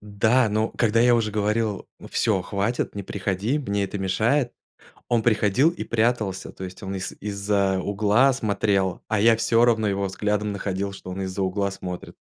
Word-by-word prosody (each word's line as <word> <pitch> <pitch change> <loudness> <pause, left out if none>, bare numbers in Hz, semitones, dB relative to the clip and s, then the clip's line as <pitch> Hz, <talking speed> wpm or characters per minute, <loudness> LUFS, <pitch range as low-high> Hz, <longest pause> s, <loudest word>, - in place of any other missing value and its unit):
да, 110 +4 +2
но 110 +1 0
когда 115 -1 +1
я 120 0 +5
уже 110 -2 0
говорил: 105 0 -1 0.2
"Всё, 100 -5 +1
хватит, 100 +5 -2
не 100 - -4
приходи, 100 +7 -2
мне 100 -8 -1
это 100 +1 -5
мешает", 115 +7 +1 0.6
он 120 -2 +1
приходил 110 +5 +3
и 175 - -6
прятался, 110 -4 -1
то - - -10
есть 95 +3 -8
он 95 0 -4
из 95 0 -4
из-за 100 -1 0
угла 105 +7 +3
смотрел, 100 -5 0
а 110 -1 0
я 115 +2 +5
всё 115 +1 +3
равно 110 -3 +2
его 100 0 -1
взглядом 105 +2 -1
находил, 100 0 -3
что 95 - -10
он 95 +1 -5
из-за 95 +1 -4
угла 100 +1 0
смотрит. 90 -2 -7
105 Hz, 175 wpm, -24 LUFS, 100-115 Hz, 0.6 s, я